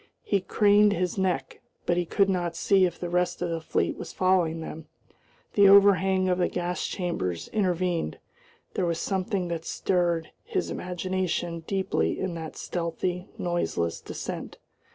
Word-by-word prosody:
He 200 - +1
craned 205 +1 +4
his 180 +1 -1
neck, 180 -8 -1 0.2
but 175 - +2
he 175 0 0
could 200 +2 +3
not 175 -3 -1
see 195 -2 +4
if 175 - -8
the 175 - -3
rest 175 0 0
of 175 - -1
the 165 -1 -2
fleet - - 0
was - - -6
following 180 -3 +2
them; 160 -1 -7 0.7
the 200 -1 +7
overhang 195 -1 +6
of 180 0 +1
the 180 - +3
gas 180 0 -2
chambers 95 - -3
intervened. 180 - 0 0.6
There 180 - 0
was 170 -1 0
something 190 -1 -1
that 165 -1 -3
stirred 170 -2 0
his - - -2
imagination 180 -2 -2
deeply 190 - 0
in 185 -2 -2
that 160 -2 -7
stealthy, 175 +1 -3
noiseless 170 - -1
descent. - - -6
180 Hz, 155 wpm, -27 LUFS, 170-190 Hz, 0.7 s, the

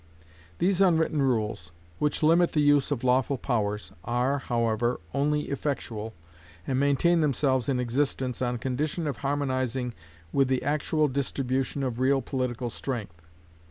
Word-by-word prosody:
These 190 +1 +2
unwritten 160 -5 +3
rules, 110 -9 -1 0.3
which 150 +1 0
limit 170 +3 +4
the 155 - +2
use 145 -1 +4
of 140 -5 -2
lawful 130 +2 +2
powers, 105 -5 -2
are, 125 +4 0
however, 120 -1 0
only 150 +2 +1
effectual, 115 -6 -3 0.5
and 130 -1 0
maintain 145 +5 +3
themselves 135 -4 +1
in 130 -2 +1
existence 125 0 -1
on 125 -1 0
condition 150 +7 -2
of 145 -3 -2
harmonising 130 -3 -1 0.4
with 135 -1 +3
the 130 -1 0
actual 150 +1 +1
distribution 135 0 -1
of 125 -2 -2
real 135 +1 +3
political 125 -3 -3
strength. 105 -13 -5
130 Hz, 135 wpm, -27 LUFS, 120-145 Hz, 0.5 s, limit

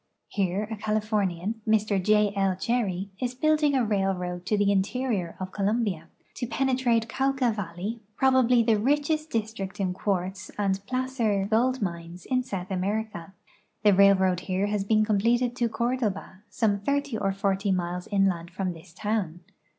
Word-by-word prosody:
Here 195 0 0
a 220 - -3
Californian, 210 -1 -1
Mr 215 -2 +2
J. 210 0 +3
L. 195 -1 +1
Cherry, 195 -3 -1
is 250 0 -2
building 305 +1 +2
a 255 -3 +2
railroad 185 -3 -1
to 210 - +2
the 200 0 +3
interior 200 -2 -1
of 185 0 -5
Colombia, 200 -5 -1 0.3
to 245 - -3
pene 260 +3 +1
trate 235 -3 +1
Cauca 265 -1 +1
valle}^ 200 +3 -5 0.2
probabl}'' 255 -3 +4
the 220 -2 +3
richest 295 +5 +1
district 215 -5 -3
in 185 -2 0
quartz 190 0 -2
and 195 -1 0
placer 250 -6 0
gold 235 +3 +1
mines 170 -1 -5
in 255 -1 +1
South 195 -6 -5
America. 195 -1 -3 0.5
The 205 -1 +6
railroad 190 -2 +5
here 185 +1 -1
has 205 -1 -1
been 215 +1 +3
completed 235 +4 +2
to 235 -1 +1
Cordoba, 220 -5 -2
some 205 -1 +1
thirty 280 +3 -1
or 195 -2 0
forty 195 0 0
miles 180 -1 -2
inland 190 -4 +1
from 185 +1 -3
this 165 0 -15
town. 205 -5 -2
205 Hz, 155 wpm, -27 LUFS, 190-235 Hz, 0.5 s, The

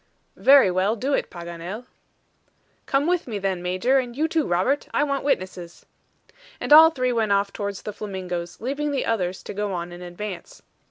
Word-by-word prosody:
"Very 270 -8 +7
well; 190 +4 +1
do 265 +5 -2
it, - - 0
Paganel." 175 +6 -7 1.0
"Come 275 +1 +1
with 355 -2 0
me, 220 -4 -3
then, 190 -2 -2
Major, 185 +10 +2
and 245 -1 -5
you 315 +2 +2
too 320 -2 0
Robert. 190 +12 +1
I - - +3
want 280 -2 -1
witnesses." 185 -9 -3 0.7
And - - +2
all 320 +1 +10
three 255 -5 -1
went 220 -3 +1
off 200 0 +1
towards 200 -2 -5
the 210 - -5
flamingos, 180 -4 -5
leaving 280 +5 -2
the 280 -2 -1
others 185 -5 -1
to - - -7
go 205 0 -2
on 175 0 -4
in 175 0 -10
advance. 180 +1 -8
205 Hz, 180 wpm, -24 LUFS, 180-270 Hz, 1.0 s, all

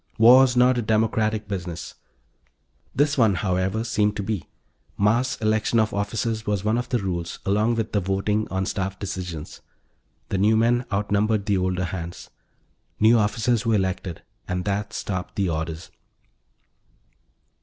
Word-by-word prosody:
War's 125 +2 +7
not 125 0 +4
a - - 0
democratic 110 -1 0
business. 90 -4 -5 1.0
This 145 0 +2
one, 110 -5 +4
however, 95 +3 0
seemed 105 -3 +1
to 100 - -3
be. 100 -4 -4 0.5
Mass 120 +6 +2
election 110 +1 +1
of 110 +1 +1
officers 110 +2 -2
was 105 -2 0
one 110 +3 +1
of 125 +1 -5
the 125 - +1
rules, 90 -5 -3
along 105 +4 +2
with 115 -1 -2
the 105 - +1
voting 100 +3 -1
on 95 0 -1
staff 95 0 -3
decisions. 90 -5 -6 0.7
The 95 - -1
new 110 +3 +4
men 120 +2 +2
out 100 0 -2
numbered 105 0 +1
the 100 -2 +1
older 95 0 0
hands. 85 -1 -7 0.7
New 110 +2 +5
officers 110 +2 +1
were 115 -1 +2
elected 95 -3 -2 0.2
and 90 0 -2
that 100 +1 -2
stopped 90 -4 -4
the 100 -3 0
orders. 80 +1 -4
105 Hz, 150 wpm, -24 LUFS, 95-110 Hz, 1.0 s, War's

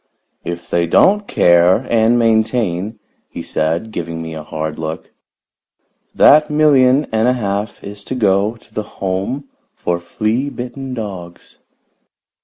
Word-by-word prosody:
If 85 0 -6
they 85 0 0
don't 205 - +3
care 90 +7 +4
and 115 +1 +3
maintain," 110 -3 0 0.3
he - - -7
said, 80 +8 -2
giving 85 -3 -5
me 80 0 -6
a 80 - -6
hard 80 0 -5
look, 80 0 -6 1.0
"that 150 +1 +6
million 145 -2 +4
and 110 +1 +1
a 125 - +3
half 105 -3 -3
is 100 0 -9
to 130 - -4
go 105 -1 +1
to 110 -1 -20
the 110 -1 -6
Home 100 +9 -3 0.3
for 85 0 -2
Flea 110 +9 -2
Bitten 125 +1 -6
Dogs." 95 -6 -8
110 Hz, 135 wpm, -17 LUFS, 85-125 Hz, 1.0 s, that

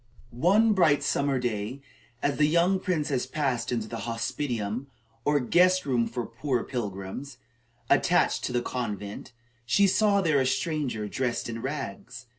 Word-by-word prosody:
One 200 - +4
bright 150 -7 +3
summer 140 -1 +1
day, 120 +2 -3 0.4
as 145 - +1
the 150 - +4
young 170 +4 +3
princess 150 -9 -1
passed 130 -5 -1
into 115 -3 -1
the 115 - -5
hospitium, 115 0 -3 0.4
or 145 0 +3
guest 180 +7 +3
room 120 -4 +1
for 120 -2 -4
poor 125 +1 -2
pilgrims, 120 +3 -5 0.5
attached - - +3
to - - -2
the 120 -1 0
convent, 105 -6 -5 0.3
she 200 - +3
saw 200 +1 +3
there 155 -7 +2
a - - +1
stranger, 135 -5 -1
dressed 125 +2 -2
in 115 -1 -5
rags. 130 -2 -6
130 Hz, 145 wpm, -27 LUFS, 115-150 Hz, 0.5 s, One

